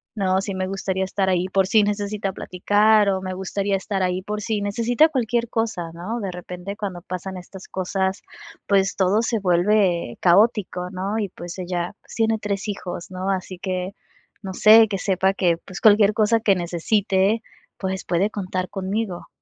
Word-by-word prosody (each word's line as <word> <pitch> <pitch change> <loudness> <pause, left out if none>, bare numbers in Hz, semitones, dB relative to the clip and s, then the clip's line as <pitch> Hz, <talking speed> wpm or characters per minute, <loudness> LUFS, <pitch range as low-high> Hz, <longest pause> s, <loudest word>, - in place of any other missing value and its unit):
¿no? 190 -2 +1
Sí 195 -1 -4
me 185 0 -2
gustaría 190 0 -2
estar 190 0 -1
ahí 180 -1 +1
por 190 0 +2
si 215 +2 +4
necesita 205 -1 -2
platicar, 205 +4 +3
o 190 -1 0
me 185 0 -4
gustaría 195 +2 -2
estar 195 0 -3
ahí 180 0 0
por 210 +2 -4
si 215 -1 -1
necesita 235 +9 +2
cualquier 240 -4 0
cosa, 215 -7 -2
¿no? 190 +8 -4
De 195 -2 -3
repente, 180 +2 -7
cuando 195 -4 -5
pasan 185 +1 -6
estas 185 +1 -11
cosas, 190 +1 -2 0.5
pues 195 -1 +2
todo 195 +3 +3
se 230 -1 0
vuelve 180 - +2
caótico, 185 -1 +3
¿no? 195 +3 -3
Y 205 -3 -2
pues 175 0 -9
ella, 175 -1 -3
pues - - -14
tiene 225 -1 +1
3 200 0 -3
hijos, 185 -3 -5
¿no? 185 +1 -3
Así 185 -1 -4
que, 185 0 -3 0.5
no 190 -3 -6
sé, 220 +3 +7
que 200 - -2
sepa 190 0 +1
que 175 -3 +1
pues 185 +2 -10
cualquier 210 -1 +6
cosa 220 +1 +3
que 205 -3 +3
necesite, 190 +4 +1 0.4
pues 190 -1 -3
puede 185 +4 +1
contar 185 -2 -3
conmigo. 195 -1 -3
195 Hz, 175 wpm, -22 LUFS, 185-210 Hz, 0.5 s, sé